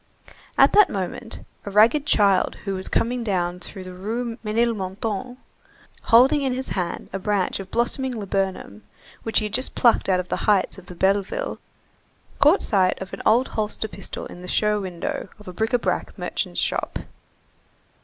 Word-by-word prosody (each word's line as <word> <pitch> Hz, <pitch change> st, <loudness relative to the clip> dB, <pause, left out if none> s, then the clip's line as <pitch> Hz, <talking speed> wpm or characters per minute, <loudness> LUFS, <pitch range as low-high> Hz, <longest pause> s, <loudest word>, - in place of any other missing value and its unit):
At -, -, +6 dB
that 420 Hz, -2 st, +7 dB
moment, 200 Hz, +4 st, -5 dB, 0.2 s
a -, -, -5 dB
ragged 230 Hz, +9 st, +4 dB
child 200 Hz, -7 st, +3 dB
who 195 Hz, -, -1 dB
was 190 Hz, 0 st, -4 dB
coming 245 Hz, +1 st, 0 dB
down 180 Hz, -4 st, -1 dB
through 190 Hz, +1 st, -8 dB
the 185 Hz, 0 st, -9 dB
Rue 225 Hz, +5 st, -4 dB
Ménilmontant, 220 Hz, 0 st, -2 dB, 0.7 s
holding 255 Hz, +5 st, +6 dB
in 265 Hz, -2 st, 0 dB
his 260 Hz, +1 st, -4 dB
hand 175 Hz, -3 st, -3 dB
a 195 Hz, -, -2 dB
branch 200 Hz, -1 st, 0 dB
of 190 Hz, -1 st, -7 dB
blossoming 250 Hz, +3 st, 0 dB
laburnum 195 Hz, -, -3 dB, 0.4 s
which 225 Hz, -, -1 dB
he 215 Hz, -, +3 dB
had 210 Hz, -, -5 dB
just 255 Hz, +2 st, 0 dB
plucked 235 Hz, -5 st, +3 dB
on 185 Hz, -1 st, +3 dB
the -, -, -1 dB
heights 200 Hz, -2 st, +1 dB
of 185 Hz, -, -17 dB
Belleville, 195 Hz, -, 0 dB, 0.8 s
caught 305 Hz, +7 st, +5 dB
sight 190 Hz, -3 st, +2 dB
of 190 Hz, -, -8 dB
an -, -, -5 dB
old 240 Hz, +4 st, +4 dB
holster 215 Hz, 0 st, -2 dB
pistol 195 Hz, -2 st, -8 dB
in 175 Hz, -, -10 dB
the 180 Hz, -, -8 dB
show 210 Hz, +2 st, +1 dB
window 185 Hz, 0 st, -4 dB
of 210 Hz, -, -16 dB
a 180 Hz, -, -6 dB
bric 220 Hz, +5 st, 0 dB
à 245 Hz, -, +2 dB
brac -, -, -2 dB
merchant's -, -, -2 dB
shop. -, -, -1 dB
210 Hz, 170 wpm, -23 LUFS, 190-235 Hz, 0.8 s, that